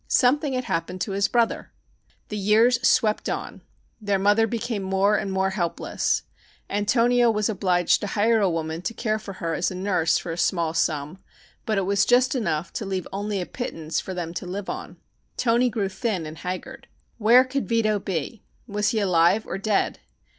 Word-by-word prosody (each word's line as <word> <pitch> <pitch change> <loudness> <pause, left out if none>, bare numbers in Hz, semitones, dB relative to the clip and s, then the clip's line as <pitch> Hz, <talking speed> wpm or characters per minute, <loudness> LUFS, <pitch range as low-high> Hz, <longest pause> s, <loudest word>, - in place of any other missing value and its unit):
Something 280 +2 +2
had 255 0 -1
happened 170 -2 -3
to 205 - -2
his 195 0 +1
brother! 235 -1 0 0.6
The 210 - -4
years 220 +4 +3
swept 220 -5 +2
on. - - -5 0.4
Their 205 -2 +1
mother 205 +3 +3
became 230 -1 -3
more 195 +2 +2
and 200 -2 -2
more 190 0 +1
helpless. 175 -4 -1 0.5
Antonio 235 +4 +3
was 215 -1 +1
obliged 180 -4 +2
to 205 - -3
hire 220 +3 +2
a 195 - +3
woman 160 0 -3
to 225 +5 -4
care 215 -2 -1
for 205 -2 -8
her 165 -3 -3
as 165 - 0
nurse 185 -3 +1
for 170 - -5
a 165 - -5
small 170 -2 +1
sum, 160 +1 -1 0.5
but 215 -2 +1
it 195 - +1
was 200 +1 +2
just 245 +3 +3
enough 170 - -2
to 215 - -4
leave 190 -2 -3
only 205 0 -2
a - - -3
pittance 165 -10 -4
for 190 - -6
them 170 -2 -4
to 180 +1 -5
live 190 +2 -4
on. - - -8 0.4
Toni 245 +1 +2
grew 210 -3 -1
thin 190 -3 -2
and 155 +1 -8
haggard. 185 +9 -6 0.3
Where 235 +4 +6
could 265 +1 -3
Vito 215 -3 +2
be? 190 +3 -4 0.2
Was 210 -1 0
he 225 -2 0
alive 185 +1 +3
or 190 - -4
dead? 205 0 0
200 Hz, 185 wpm, -24 LUFS, 180-225 Hz, 0.6 s, Where